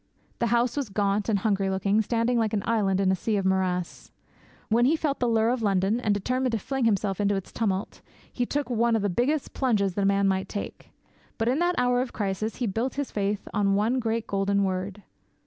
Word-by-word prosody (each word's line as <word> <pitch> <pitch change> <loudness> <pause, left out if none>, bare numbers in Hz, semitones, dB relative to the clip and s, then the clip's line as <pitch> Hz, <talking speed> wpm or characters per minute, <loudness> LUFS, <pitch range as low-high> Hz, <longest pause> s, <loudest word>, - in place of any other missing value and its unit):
The 235 - +1
house 235 +1 +1
was 280 -6 -2
gaunt 200 +1 0
and 210 - +3
hungry 195 -1 0
looking, 195 +3 +1
standing 235 +2 +1
like 220 -2 0
an 205 -2 0
island 200 -4 +1
in 190 -1 +3
a - - +2
sea 210 +3 -1
of 195 - -1
morass. 185 -2 -1 0.6
When 235 +2 +3
he 300 +5 +4
felt 300 -3 -1
the 245 - +1
lure 225 0 +3
of 250 -1 -1
London, 200 +2 +1
and 220 -4 0
determined 250 +5 0
to - - +2
fling 265 +4 -2
himself 200 -3 +1
into 200 0 +2
its 195 - -5
tumult, 200 -3 -2 0.3
he 245 - -1
took 290 0 -1
'one 235 0 +2
of 220 - 0
the 205 - +1
biggest 265 - 0
plunges 210 -8 +1
that 200 - -2
a - - +2
man 200 0 +3
might 190 0 0
take.' 205 - -6 0.5
But 225 0 +1
in 265 +5 +1
that 350 +1 +1
hour 245 0 +2
of 255 - -4
crisis 205 +1 -2
he 250 - -2
built 225 +5 -2
his 285 -1 -3
faith 205 0 -2
on 200 -1 +2
one 225 +6 +1
great 225 -1 -1
golden 200 0 +1
word. 190 +1 -3
215 Hz, 225 wpm, -26 LUFS, 195-240 Hz, 0.6 s, he